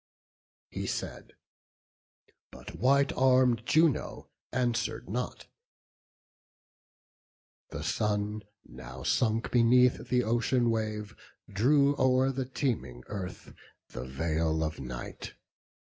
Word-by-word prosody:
He - - -4
said, - - -5 1.2
but - - -11
white 140 +3 +3
arm'd 125 -3 +3
Juno 160 -4 +1 0.2
answer'd 120 -2 -1
not. - - -4 2.2
The - - -6
sun, 105 0 -1 0.2
now 65 0 -10
sunk 115 - +1
beneath 125 +1 +4
the 125 0 +2
ocean 120 +1 +1
wave, 110 -1 -3 0.3
Drew 140 +7 +3
o'er 130 +1 +3
the 130 0 -3
teeming 105 - -3
earth 95 -3 -7 0.4
the - - -7
veil 80 +3 -1
of 80 0 -3
night. 60 -1 -7
115 Hz, 95 wpm, -29 LUFS, 90-130 Hz, 2.2 s, beneath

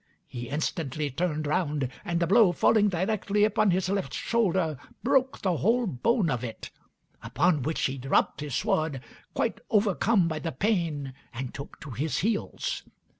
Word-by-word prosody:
He 120 -1 -7
instantly 150 -1 -2
turned 155 +1 -1
round, 145 -3 0 0.2
and 170 -4 -1
the 170 - +2
blow, 200 0 +5
falling 210 +3 +4
directly 200 +3 0
upon 215 0 +3
his 185 0 +1
left 195 0 -2
shoulder, 185 - +1 0.3
broke 265 +1 +2
the 185 -4 +1
whole 235 +8 +2
bone 195 - +1
of 125 -1 -2
it; 115 -3 -7 0.5
upon 160 -2 +1
which 155 +5 -2
he 135 0 -1
dropped 135 +2 +1
his 145 -4 -4
sword, 160 - 0 0.3
quite 225 -2 0
overcome 200 -2 +3
by 160 -2 -2
the 165 -2 -4
pain, 160 - -1 0.2
and 125 +1 -5
took 140 - -9
to 140 - -8
his 140 +6 -2
heels. 225 - -1
170 Hz, 160 wpm, -27 LUFS, 145-210 Hz, 0.5 s, blow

